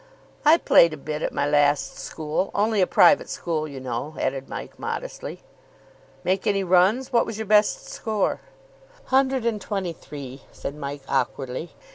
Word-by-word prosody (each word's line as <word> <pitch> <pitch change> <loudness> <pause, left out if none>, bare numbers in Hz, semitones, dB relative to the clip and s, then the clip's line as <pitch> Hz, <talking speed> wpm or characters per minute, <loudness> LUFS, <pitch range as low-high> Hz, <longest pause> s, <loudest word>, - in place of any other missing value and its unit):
"I 310 +2 +7
played 170 - +5
a - - -6
bit 150 +1 -5
at - - -1
my 140 - 0
last 145 -2 +2
school. 155 +4 -3
Only 210 0 +2
a 180 - +3
private 195 - +5
school, 155 -2 -2
you 140 -3 -8
know," 130 +4 -4
added 135 0 -2
Mike - - -7
modestly. - - -5 0.8
"Make 185 +1 0
any 195 -1 +2
runs? 190 +9 +3
What 235 - +3
was 225 - -5
your 220 - -4
best 215 - +3
score?" 220 - -1 0.7
"Hundred 265 -2 +3
and 220 -3 0
twenty 190 -5 -3
three," 140 -4 -9
said 140 - -6
Mike 140 -1 -6
awkwardly. 135 +3 -2
175 Hz, 160 wpm, -24 LUFS, 145-215 Hz, 0.8 s, I